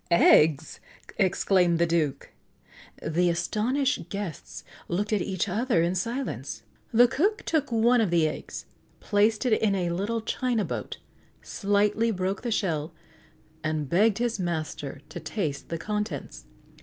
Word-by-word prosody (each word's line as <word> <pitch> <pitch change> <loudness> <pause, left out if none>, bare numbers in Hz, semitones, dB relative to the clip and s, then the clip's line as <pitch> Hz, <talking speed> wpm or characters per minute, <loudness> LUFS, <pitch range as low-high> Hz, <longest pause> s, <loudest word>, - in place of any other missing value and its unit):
"Eggs!" 160 -3 +4 0.4
exclaimed 185 -2 +3
the 170 - +3
Duke. 165 -4 -1 0.7
The 175 +3 +1
astonished 225 +11 0
guests 200 -7 -6 0.2
looked 205 +5 -1
at 205 - +2
each 190 +2 -2
other 210 -2 +1
in 170 +1 +1
silence. 230 +9 -4 0.3
The 240 +2 +6
cook 400 - 0
took 300 -5 0
one 235 +1 +4
of 215 - +1
the 165 -2 +3
eggs, 155 - -6 0.3
placed 210 +3 +2
it 245 - +3
in 205 -2 +2
a 175 -3 -1
little 205 +6 -1
china 235 -1 -1
boat, - - -5 0.5
slightly 205 +2 +1
broke 190 -1 -2
the 245 - -3
shell, 165 -7 -1 0.7
and 155 -2 -1
begged 200 +7 +3
his 235 -3 -1
master 155 -5 -4
to 165 - -7
taste 155 -4 -4
the 165 - -2
contents. 210 +4 -4
195 Hz, 140 wpm, -27 LUFS, 170-225 Hz, 0.7 s, The